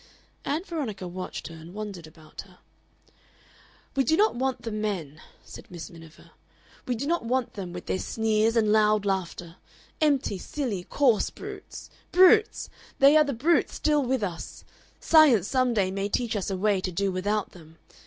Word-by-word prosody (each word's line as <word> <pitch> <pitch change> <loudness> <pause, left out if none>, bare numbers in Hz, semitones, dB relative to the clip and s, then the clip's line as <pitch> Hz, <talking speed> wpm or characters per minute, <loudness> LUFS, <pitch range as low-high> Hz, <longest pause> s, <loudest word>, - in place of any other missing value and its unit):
Ann 300 +5 -1
Veronica 255 - -5
watched 185 +1 -6
her 165 - -10
and 165 +3 -12
wondered 200 -6 -6
about 155 -1 -12
her. 185 -2 -19 1.4
"We 270 - +3
do 315 +6 +2
not 430 +2 +4
want 260 +1 -2
the 230 - -4
men," 195 -9 -4 0.2
said - - -12
Miss 175 -2 -9
Miniver; 165 -2 -15 0.6
"we 250 - 0
do 235 - -4
not 340 0 0
want 250 +1 -1
them, 190 -4 -6
with 180 0 -8
their 185 - -2
sneers 220 0 0
and 215 -2 +3
loud 215 -1 +3
laughter. 180 -3 -3 0.4
Empty, 275 -10 +1
silly, 220 -11 -4
coarse 250 -7 +2
brutes. - - -10 0.2
Brutes! 375 +4 +5 0.3
They 275 +2 +6
are 310 - +7
the 285 -2 -3
brute 305 +9 +2
still 300 -2 +1
with 255 -2 -1
us! 175 -4 -6 0.3
Science 280 - +5
some 255 -1 +1
day 190 -3 +1
may 195 +1 -2
teach 235 +1 -1
us 200 -1 -2
a 190 - -2
way 200 0 +1
to 185 - -3
do 195 +3 -1
without 205 +3 -1
them. 165 -2 -16
215 Hz, 175 wpm, -26 LUFS, 185-265 Hz, 1.4 s, are